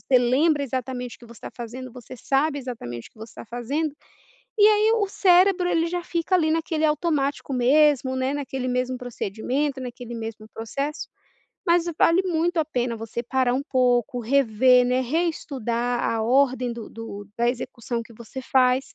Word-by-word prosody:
você 255 -2 +3
lembra 285 +5 +2
exatamente 255 -2 -4
o - - -43
que 240 - -13
você 235 - -13
está - - -8
fazendo, 245 +1 -7
você 250 0 -11
sabe 280 +4 0
exatamente 220 - -7
o - - -44
que - - -24
você 220 +1 -10
está - - -10
fazendo, 270 +7 -2 0.6
e 415 0 +7
aí 430 +1 +4
o 415 -3 0
cérebro, 365 -1 +4
ele 330 -1 +2
já 355 +1 -3
fica 340 +2 -1
ali, 315 -3 +1
naquele 320 -1 0
automático 295 -3 -1
mesmo, 265 +1 +3
né, 260 +1 0
naquele 265 -3 -3
mesmo 250 +1 -1
procedimento, 250 +4 -3
naquele 245 -1 -7
mesmo 225 -1 -6
processo. 275 +7 -4 0.6
Mas 340 0 +4
vale 340 +3 +4
muito 345 -1 0
a 320 - +3
pena 245 -5 -2
você 225 +2 -5
parar 255 0 +1
um 265 +3 0
pouco, 250 -3 +1
rever, 250 0 +4
né, 250 +1 +2
reestudar 250 -5 -1
a 225 -1 0
ordem 255 0 +2
do 230 -2 -8
do 205 -3 -8
da 235 +1 +2
execução 240 -1 -3
que 230 - -15
você 235 +4 -8
faz, 255 0 +2
255 Hz, 175 wpm, -24 LUFS, 240-300 Hz, 0.6 s, e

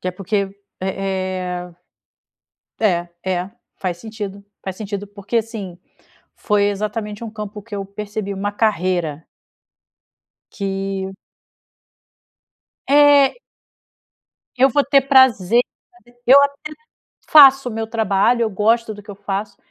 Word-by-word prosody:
Que 185 - -3
é - - -1
porque 195 +2 -2 0.3
é 185 -2 -3 1.1
é 175 -5 +1 0.2
é 190 - 0
é 185 - -10 0.3
faz 180 -3 -3
sentido 205 -1 -7 0.2
faz 190 -1 -5
sentido 205 -1 -5
porque, 205 +3 -5
assim, 215 -6 -3 0.6
foi 210 -1 +1
exatamente 210 +1 -3
um 225 - -6
campo 210 -1 -7
que 215 +1 -9
eu 200 -1 -4
percebi 200 0 -5
uma 205 +1 -3
carreira 180 -7 -1 1.3
que 195 -1 -4 1.7
É 285 -1 +6 1.2
Eu 260 +2 +5
vou 280 +2 +2
ter 280 0 +4
prazer 245 -6 +4
de 360 +2 -12
fazer 240 0 -35
eu 275 +3 +8
até 280 +2 -2 0.6
faço 270 -3 +8
o - - -6
meu 225 0 -3
trabalho, 225 +1 +1
eu 225 - 0
gosto 220 +3 +1
do 205 - -12
que 205 - -11
eu 200 - -9
faço, 200 0 -4
205 Hz, 130 wpm, -20 LUFS, 195-230 Hz, 1.7 s, eu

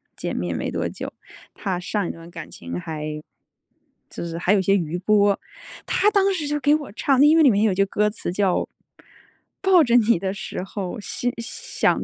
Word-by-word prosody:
见 - - -4
面 85 -1 -2
没 - - -2
多 - - -1
久。 - - -7 0.4
他 185 -3 -2
上 200 0 -2
一 - - -2
段 165 +1 -12
感 165 -2 -8
情 85 +1 -6
还 155 - -5 1.0
就 - - -6
是 165 0 -5
还 180 +3 +2
有 200 - +3
些 195 +2 +3
余 170 -3 -1
波。 200 +1 +3 0.5
他 420 - +3
当 395 -1 +3
时 320 -6 -2
就 295 0 -1
给 290 +1 +4
我 295 -7 -5
唱， 270 +4 +3
因 310 +2 +6
为 320 - +6
里 280 - +7
面 205 +1 +2
有 220 - +3
一 - - -1
句 195 +1 +3
歌 210 +2 +1
词 205 -4 -3
叫： 190 -1 +1 0.9
“抱 380 -3 +6
着 240 -2 +2
你 230 -5 +4
的 190 +1 -2
时 200 - -5
候， 195 +2 -5
心 245 +4 -3
想 460 - -1
205 Hz, 220 characters per minute, -23 LUFS, 180-275 Hz, 1.0 s, 里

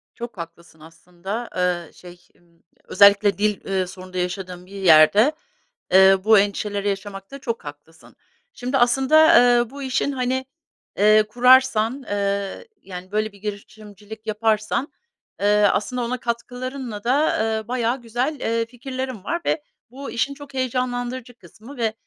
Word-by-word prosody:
Çok 235 -4 -8
haklısın 170 -1 -11
aslında. 180 +8 -8
Iıı, 180 -2 -1
şey, 175 0 -15
ımm, 170 -1 -31 0.2
özellikle 200 -1 +4
dil, 210 0 0
eee, 190 -2 -1
sorunu 185 0 -12
da 185 - -5
yaşadığın 180 0 -4
bir 185 - -19
yerde, 195 - +5 0.6
eee, 190 0 +7
bu 220 -1 +6
endişeleri 205 0 -1
yaşamakta 195 +5 -6
çok 230 - -5
haklısın. 145 +3 -13 0.4
Şimdi 255 - -2
aslında, 270 +6 +5 0.2
eee, 240 -1 0
bu 280 +2 -9
işin, 265 +2 -1
hani, 260 0 -2 0.5
eee, 215 +1 +5
kurarsan, 250 +1 +3
eee, 200 - -2
yani, 185 0 -10
böyle 215 0 -1
bir 200 - -18
girişimcilik 210 +1 -9
yaparsan, 215 +4 -1 0.5
eee, 205 0 +4
aslında 250 +4 -2
ona 250 +2 -2
katkılarınla 245 -1 -5
da, 280 +6 +2 0.2
eee, 220 - -11
bayağı 245 +1 -1
güzel, 245 +6 -3
eee, 230 0 -1
fikirlerin 255 -2 -6
var 340 +7 -3
ve 305 - 0 0.3
bu 270 -1 -8
işin 240 +4 -1
çok 285 0 -13
heyecanlandırıcı 250 -1 -3
kısmı 220 - -14
ve, 225 -2 -1
215 Hz, 140 wpm, -22 LUFS, 195-250 Hz, 0.6 s, eee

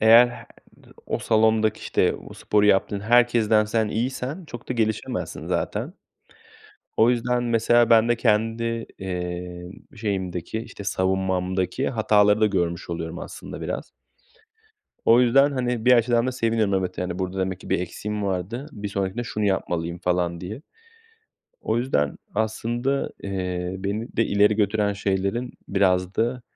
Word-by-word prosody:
eğer 115 +3 +8
he 120 - -10 0.6
o - - -1
salondaki, 110 -1 +2
işte, - - +1
o - - -10
sporu 105 -1 +2
yaptığın 100 0 +2
herkesten 115 -1 +4
sen 110 0 0
iyiysen 130 - -3
çok 120 -5 -10
da - - 0
gelişemezsin 110 -3 -2
zaten. - - -2 1.1
O 115 +2 +5
yüzden 125 0 +1
mesela 120 0 +3
ben 115 0 +5
de 120 - +4
kendi, 115 0 +1 0.4
eee, 90 -1 -5 0.2
şeyimdeki, 95 -2 -3
işte, 115 -3 -9
savunmamdaki 95 +4 0
hataları 105 -2 +3
da - - +6
görmüş 85 -5 -1
oluyorum 85 -1 -4
aslında - - -8
biraz. - - -4 1.1
O 115 +2 +6
yüzden, 135 +4 +4
hani, 125 -3 -1
bir 125 - +6
açıdan 120 0 +3
da 130 - -1
seviniyorum. 115 -4 +1
Evet, 90 -1 -2
yani, 90 0 -3
"Burada 95 0 -3
demek 95 0 -2
ki - - -11
bir - - +2
eksiğim 105 +4 -4
vardı, 100 - -3
bir 105 -2 -5
sonrakinde 100 +4 -2
şunu 105 -2 -3
yapmalıyım." 85 -3 -1
falan 90 -1 -1
diye. 105 +10 -7 1.0
O 115 - 0
yüzden 75 - 0 0.2
aslında, 120 +5 -1
eee, 90 -2 -3
beni 100 +5 -4
de 115 - +3
ileri 105 +1 +3
götüren 105 0 +1
şeylerin 100 +5 -1 0.2
biraz 90 -1 +1
da, 120 +2 0
105 Hz, 140 wpm, -24 LUFS, 95-115 Hz, 1.1 s, eğer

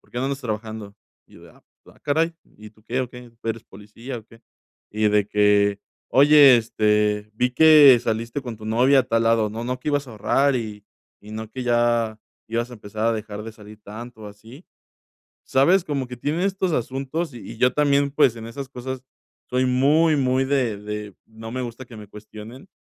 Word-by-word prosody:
"¿Por - - -29
qué 120 - -5
no 130 - -1
andas 140 0 -3
trabajando?". 110 -3 -6 0.3
Y - - -22
yo - - -16
de: - - -15
"Ah, - - -23 0.2
ah - - -19
caray, 160 +3 0 0.2
¿y 105 0 -13
tú 110 -1 -27
qué 130 - -2
o 130 - -3
qué? 125 -1 -12
¿Tú 115 0 -9
eres 115 0 -4
policía 115 +5 -9
o 110 - -15
qué?". 115 +1 -19 0.5
Y 105 0 +1
de 105 -1 +2
que: 105 -1 +2 0.3
"Oye, 140 -1 +7
este, 105 -2 0
vi 125 +2 0
que 150 -4 +7
saliste 115 +4 -3
con 120 -4 -7
tu 110 - -12
novia 125 +5 +4
a - - -1
tal 115 0 0
lado, 115 -2 +2
no 115 +2 -6
no 125 +1 -3
que 150 - -4
ibas 145 -1 0
a 120 - -10
ahorrar 135 +6 +1
y 105 -3 -6 0.4
y 105 - -14
no 110 0 -6
que 130 +2 -6
ya 120 -2 +1 0.3
ibas 120 +2 -2
a - - -9
empezar 105 +1 -4
a 115 - +3
dejar 105 -1 -6
de 115 - -7
salir 105 0 -15
tanto 110 +2 -10
o 105 - -8
así", 110 - -15 0.8
¿sabes? 170 +8 +3
Como 140 -4 -3
que 125 - -8
tiene 155 +9 -2
estos 190 -2 -1
asuntos 135 +4 -3
y - - -8
y - - -12
yo 125 +1 +3
también, 140 -1 +2
pues, 135 -5 +3
en 115 0 -8
esas 130 +3 -7
cosas 130 0 -7 0.5
soy 130 +1 +1
muy, 150 +5 +3
muy 130 -1 +1
de 130 -6 0
de 105 -1 -7
no 110 +1 -10
me 130 0 -3
gusta 120 +2 -7
que 120 -2 -13
me 105 -1 -11
cuestionen 110 - -12
120 Hz, 215 wpm, -22 LUFS, 110-135 Hz, 0.8 s, Oye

